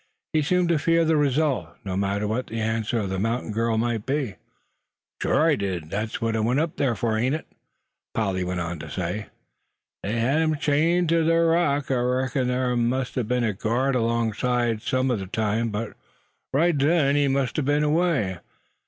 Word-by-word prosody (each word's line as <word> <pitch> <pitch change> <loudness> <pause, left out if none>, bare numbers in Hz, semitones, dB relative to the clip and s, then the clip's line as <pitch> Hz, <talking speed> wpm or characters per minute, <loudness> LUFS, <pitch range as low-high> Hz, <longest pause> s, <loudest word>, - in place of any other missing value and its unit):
He 155 - +3
seemed 180 +4 +2
to 165 -3 +3
fear 165 +2 +3
the 160 0 +3
result, 145 -1 +1
no 95 -1 -3
matter 100 +2 0
what 115 +4 -2
the 115 - -4
answer 110 +1 -1
of 100 - -3
the 95 - -2
mountain 115 +2 -1
girl 115 +1 0
might 115 -1 0
be. 135 -6 -1 0.8
"Sure 160 - +3
I 155 - +4
did. 90 - -4
Thet's 110 +2 -3
what 115 -1 -1
I - - 0
went 120 +5 +1
up 160 0 -1
thar 130 -5 +1
fur, 110 0 0
ain't 130 +5 +1
it?" 155 - -6 0.7
Polly 95 -4 0
went 90 0 -2
on 85 -1 -4
to - - -8
say. 95 +3 -3 0.7
"They 100 - -3
hed 130 +7 +2
him 155 -1 +1
chained 160 +4 +2
ter 165 0 +3
ther 165 +1 +3
rock. 145 -5 +1
I 130 - +2
reckons 130 +1 0
thar 125 0 0
mout 125 +2 0
a 125 - 0
be'n 125 +2 0
a 110 -3 +1
guard 120 +7 0
alongside, 115 0 0
sum 130 +2 0
o' 120 - +1
ther 95 - -6
time; 110 +2 0
but 105 +1 -4 0.6
right 165 +5 +3
then 145 0 +3
he 145 -1 +3
must 135 0 0
a - - +2
be'n 145 +2 +1
away. 150 - +1
125 Hz, 195 wpm, -24 LUFS, 110-145 Hz, 0.8 s, I